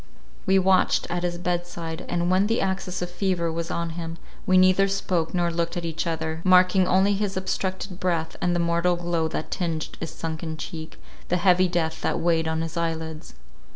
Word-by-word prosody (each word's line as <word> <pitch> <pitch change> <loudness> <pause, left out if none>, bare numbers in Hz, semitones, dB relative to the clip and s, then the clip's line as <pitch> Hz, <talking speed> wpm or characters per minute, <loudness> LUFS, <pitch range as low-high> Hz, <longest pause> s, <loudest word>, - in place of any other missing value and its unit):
We 190 0 +5
watched 190 0 +3
at 175 0 -1
his 175 -1 -2
bedside, 175 -2 -3
and 175 0 0
when 190 +2 +3
the 230 +2 +1
access 190 -2 -2
of 175 - -5
fever 180 -3 0
was 165 +1 -3
on 170 -1 -2
him, 165 0 -6 0.3
we 185 - +5
neither 185 +1 +5
spoke 185 -4 -1
nor 175 -1 +1
looked 170 +1 -2
at 170 - -3
each 165 0 -2
other, 160 0 -2
marking 185 0 +5
only 190 +2 +4
his 200 -1 -1
obstructed 190 0 -3
breath 170 -3 -1
and 175 0 +1
the - - +1
mortal 170 +1 +2
glow 170 -2 -1
that 160 - -5
tinged 165 -3 -2
his 165 - -4
sunken 160 0 -5
cheek, 160 0 -7 0.3
the 180 - +1
heavy 180 +1 +4
death 165 -2 -1
that - - 0
weighed 165 -1 +2
on 160 0 -1
his 165 0 -5
eyelids. 160 - -3
175 Hz, 190 wpm, -25 LUFS, 165-185 Hz, 0.3 s, We